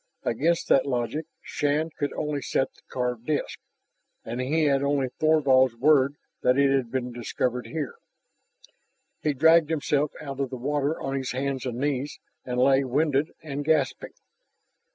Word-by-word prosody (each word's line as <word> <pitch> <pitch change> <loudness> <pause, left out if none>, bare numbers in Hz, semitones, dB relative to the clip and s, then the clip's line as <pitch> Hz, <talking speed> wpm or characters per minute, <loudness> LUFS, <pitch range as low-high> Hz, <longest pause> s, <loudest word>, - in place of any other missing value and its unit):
Against 160 +9 0
that 135 - +4
logic 135 +5 -2 0.2
Shann 150 +3 -1
could 145 - -2
only 150 -2 -2
set 135 - -1
the - - -24
carved 125 -2 -3
disk, 150 -2 -2 0.7
and 120 +3 -3
he 155 +5 +1
had 140 -2 +3
only 140 -2 +1
Thorvald's 135 -6 +4
word 140 +2 +4 0.3
that 125 - +3
that 140 0 +4
had 130 -4 -1
been 125 -1 -3
discovered 120 +1 -2
here. 160 -1 -4 1.3
He 150 - +1
dragged 160 +2 +5
himself 150 -2 0
out 140 -2 -7
of 135 -2 -1
the 130 - -6
water 145 +4 -1
on 135 - -3
his 135 -2 -2
hands 135 0 -2
and 120 -1 -4
knees 140 +1 -2 0.3
and 125 -1 -3
lay, 135 +1 +4
winded 145 +3 +1
and 145 -2 -4
gasping. 145 -3 0
140 Hz, 155 wpm, -26 LUFS, 130-150 Hz, 1.3 s, dragged